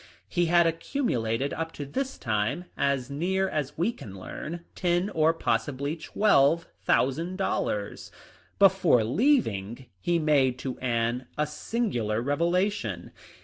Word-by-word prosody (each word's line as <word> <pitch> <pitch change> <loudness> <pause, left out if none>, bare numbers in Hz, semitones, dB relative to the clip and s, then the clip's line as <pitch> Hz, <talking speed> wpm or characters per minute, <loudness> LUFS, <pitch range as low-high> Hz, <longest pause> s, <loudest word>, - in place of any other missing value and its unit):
He 175 -1 +1
had 170 0 +5
accumulated 145 - -1
up 165 0 -3
to 145 - -6
this 265 - -3
time, 115 +10 -1
as 140 -1 0
near 190 +6 0
as 150 -6 -3
we 175 +8 +1
can 100 - -10
learn, 170 - -7
ten 175 +2 0
or 160 -2 +3
possibly 140 0 -1
twelve 165 -2 +3 0.2
thousand 165 +8 +1
dollars. 105 - -2 0.5
Before 185 - +5
leaving 120 - +1
he 170 - +1
made 140 -5 +3
to 130 0 -5
Anne 120 0 -1
a 150 - +2
singular 150 - -2
reve 140 +5 -1
lation. 180 +5 0
150 Hz, 130 wpm, -27 LUFS, 125-175 Hz, 0.5 s, had